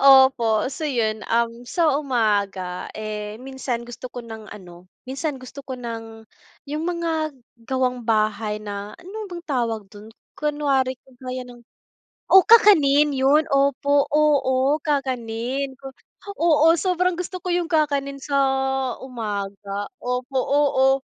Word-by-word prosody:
Opo. 265 -5 +6
So 315 - -5
yun, 220 -4 0
um, 235 +1 0
sa 330 -4 +2
umaga, 205 -8 -1
eh, 210 0 -5
minsan 260 -2 -4
gusto 240 +1 -8
ko 245 -1 -8
ng 220 -2 -9
ano, 180 -2 -12 0.2
minsan 275 +3 -3
gusto 260 +2 -10
ko 265 -2 -7
ng, 225 -2 -7 0.4
yung 300 +2 -3
mga 325 -4 -2 0.3
gawang-bahay 225 -5 0
na, 205 0 -7
ano 370 +4 -11
bang 345 0 -7
tawag 235 -6 -1
dun? 210 +1 -12 0.3
Kunwari 280 -3 0
kagaya 255 0 -7
ng 245 -1 -13 0.7
o 380 -1 +8
kakanin 300 -10 +6
yun, 280 +4 +4
opo, 280 +1 +3
oo 285 -2 +3
kakanin 260 -2 -2
ko 270 - -7 0.5
oo 325 -1 +5
sobrang 365 0 +1
gusto 365 +1 -5
ko - - -5
yung 350 -1 0
kakanin 280 -3 0
sa 280 +1 -2 0.7
umaga. 205 -4 -5
Opo, 250 +2 -3
oo 270 -1 +3
260 Hz, 125 wpm, -23 LUFS, 225-290 Hz, 0.7 s, o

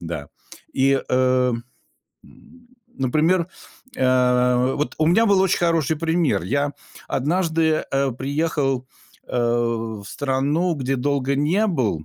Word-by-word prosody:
Да. 80 -4 -6 0.4
И, 135 0 +2
э 130 0 +2 1.5
Например, 160 +7 +1 0.5
э, 125 0 +2
вот 150 - -2
у 155 - +2
меня 220 +7 +4
был 200 -2 +4
очень 190 -1 +2
хороший 165 -3 +1
пример. 160 - 0
Я 140 +10 -1 0.4
однажды, 160 +1 0
э, 135 0 +1
приехал, 135 -1 -1 0.4
э, - - -4
в 115 -3 -1
страну, 145 - 0
где 135 -2 -2
долго 140 +1 0
не 170 +10 +2
был, 120 - -1
135 Hz, 115 wpm, -22 LUFS, 125-160 Hz, 1.5 s, меня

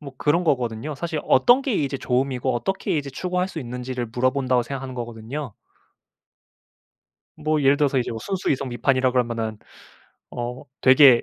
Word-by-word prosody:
뭐 140 -3 -9
그런 160 +4 +2
거거든요. 125 -1 -1
사실 160 -1 -3
어떤 245 - +5
게 265 - -1
이제 140 -7 0
좋음이고 130 0 0
어떻게 155 +8 -1
이제 140 -1 -4
추구할 180 +5 -1
수 160 - -6
있는지를 125 0 -4
물어본다고 130 0 +1
생각하는 135 0 -6
거거든요. 120 +2 -6 1.8
뭐 155 0 0
예를 140 +1 +4
들어서 145 -3 +2
이제 120 - 0
순수이성비판이라 130 -7 0
그러면은 115 -3 -1 0.7
어 120 +1 -5 0.2
되게 130 -2 +7
130 Hz, 360 characters per minute, -23 LUFS, 125-150 Hz, 1.8 s, 되게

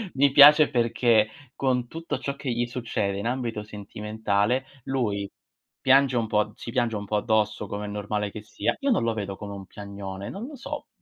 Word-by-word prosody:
Mi 140 0 +4
piace 145 +2 +9
perché 115 -2 +3 0.3
con 125 -3 0
tutto 165 +4 -5
ciò 140 0 -3
che 140 -2 -5
gli 120 +1 0
succede 115 -5 -2
in 100 - -4
ambito 120 -4 -2
sentimentale, 105 +3 -1 0.2
lui 105 -7 -1 0.5
piange 135 -1 +4
un 115 -1 0
po' 105 -1 +1
si 115 - -7
piange 120 -3 0
un 105 0 -4
po' 105 - -2
addosso, 105 -1 0
come 105 +1 -4
è - - -5
normale 105 0 -3
che 110 - -7
sia. - - -2
Io 280 -2 +1
non 195 - +2
lo 115 -1 +1
vedo 100 -2 -4
come 100 -1 -7
un 95 -1 -8
piagnone, 100 -1 -7
non 205 +5 -6
lo 290 - -9
so. 260 - -6
110 Hz, 195 wpm, -26 LUFS, 105-130 Hz, 0.5 s, piace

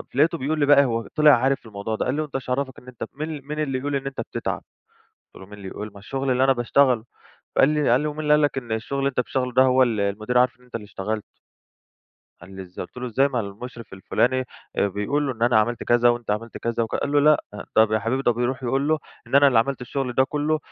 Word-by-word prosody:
لقيته 165 +4 +3
بيقول 150 +3 -2
لي 145 - +3
بقى 140 -1 +6
هو 115 -2 -2
طِلع 150 -1 +7
عارف 135 0 0
الموضوع 105 +1 -4
ده. - - -2
قال 130 - 0
لي: 155 - 0
"وأنت 150 -3 -7
ايش 130 -1 -4
عرّفك 130 0 -2
إن 125 - -21
أنت 125 -2 -8
مين 155 0 -5
مين 150 +1 -4
اللي 135 -4 -1
يقول 145 +2 -2
إن 135 0 -3
أنت 135 - -4
بتتعب." - - -4 0.7
قُلت - - -26
له: - - -10
"مين - - -13
اللي 100 -2 -9
يقول؟! 105 +2 -7
ما 100 - -12
الشغل 135 +5 -2
اللي 130 +1 +2
أنا 135 0 +5
باشتغله." 125 -1 +2 0.5
فقال 135 - +6
لي 150 -4 +1
قال 125 - +4
لي: 150 - -2
"ومين 150 +1 -5
اللي 150 -1 +2
قال 150 0 +5
لك 145 -2 +1
إن 120 -3 -6
الشغل 115 +5 -3
اللي 135 0 +1
أنت 130 - -1
بتشتغله 125 0 -2
ده 130 +2 +5
هو 130 0 +4
ال 115 -4 +1
المدير 110 +5 0
عارف 125 0 +2
إن 125 - -21
أنت 125 - -25
اللي 110 -2 -4
اشتغلت؟" 105 +1 -4 1.2
قال 95 +3 -12
لي: 95 - -6
"إزاي؟" 90 0 -8
قُلت - - -36
له: 125 - -4
"إزاي؟ 135 +4 +2
ما 125 -4 -1
المُشرف 115 +3 -8
الفُلاني 125 +7 0 0.3
أ - - +3
بيقول 105 +10 -1
له 135 - -1
إن 115 -1 -9
أنا 120 -2 +4
عملت 120 +2 -2
كذا 120 0 +4
وأنت 120 -3 0
عملت 110 +2 -3
كذا." 115 0 -1
وك 115 - -4
قال 145 - -1
له: 145 - +4
"لأ 150 +1 +4 0.3
طب 110 0 +4
يا 110 - +3
حبيبي 115 +5 -1
ده 120 - +3
بيروح 125 +3 -2
يقول 135 +4 0
له 155 0 +2 0.3
إن - - -6
أنا 140 0 +7
اللي 125 -4 +3
عملت 135 +3 0
الشغل 125 0 -3
ده 130 +2 +3
كُلّه 150 +2 -1
125 Hz, 265 wpm, -23 LUFS, 115-140 Hz, 1.2 s, طِلع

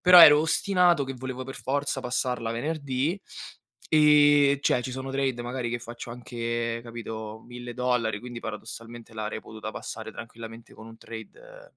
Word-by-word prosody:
Però 180 0 +9
ero 150 -3 +11
ostinato 175 -2 +3
che 135 - -4
volevo 130 0 -5
per 135 - -7
forza 140 0 -1
passarla 125 -2 -1
venerdì, 140 - -1 0.7
ehm, 145 -2 +6
cioè 125 -3 +2
ci 130 - -4
sono 130 +1 -5
trade 135 -3 0
magari 120 0 -3
che 120 - -1
faccio 120 0 -8
anche, 115 -1 -3
capito, 110 -2 -7
1.000$ 120 -2 -1
quindi 120 -1 -7
paradossalmente 115 +1 -8
l'avrei 110 0 -4
potuta 110 0 -7
passare 110 0 -7
tranquillamente 115 0 -10
con 110 - -12
un 115 0 -12
trade - - -11
125 Hz, 150 wpm, -27 LUFS, 115-140 Hz, 0.7 s, ero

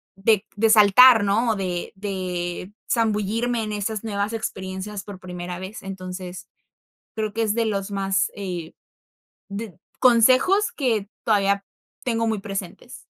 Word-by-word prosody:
de 205 +1 +2
de 220 +2 +3
saltar, 220 +2 +8
¿no? 225 +4 +2
O - - 0
de 180 -3 -3
de 185 -2 -4 0.2
zambullirme 225 +1 0
en 215 - -4
esas 210 +1 -3
nuevas 205 0 -2
experiencias 195 -1 -5
por 200 -3 -9
primera 180 -1 -6
vez. 190 +3 -8
Entonces, 185 -1 -7 0.7
creo 215 -2 -2
que 230 - -1
es 215 -2 +1
de 230 0 +1
los 200 -2 -2
más, 195 -1 0
eh, 180 -5 -5 0.8
did 200 0 -6 0.3
consejos 260 - +5
que 225 -8 -1 0.2
todavía 200 -2 +2 0.4
tengo 230 -2 0
muy 220 -2 -1
presentes. 195 -3 -7
205 Hz, 135 wpm, -23 LUFS, 190-225 Hz, 0.8 s, saltar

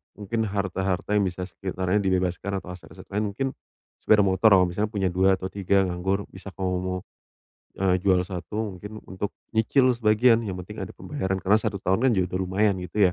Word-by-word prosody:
mungkin 105 +2 -4
harta-harta 95 -2 -2
yang 100 - +3
bisa 90 0 -5
sekitarnya 95 +1 -1
dibebaskan 95 -1 0
atau - - -12
aset-aset 90 0 -12
lain, 105 0 -1
mungkin 135 +6 -1 0.5
sepeda 105 -1 +4
motor 100 +3 +4
kamu 90 -1 +3
misalnya 105 +4 -1
punya 95 -3 +1
2 95 +2 +3
atau 95 0 -5
3 100 0 +2
nganggur, 95 +3 -1
bisa 95 +1 -10
kamu 95 -1 -2
mau, 90 0 -2 0.8
eee, 95 -1 +2
jual 95 -1 +3
1 100 +3 -4
mungkin, 105 +2 -8
untuk 95 +2 -4 0.3
nyicil 130 +4 +4
sebagian. 115 +1 +4
Yang 100 -5 -4
penting - - -9
ada - - -11
pembayaran. 95 0 -3
Karena 100 +3 +3
1 100 - -2
tahun 95 +2 +1
kan - - +4
juga 90 -1 0
udah - - +1
lumayan, 100 +1 +2
gitu 90 +1 +2
95 Hz, 190 wpm, -25 LUFS, 95-105 Hz, 0.8 s, sepeda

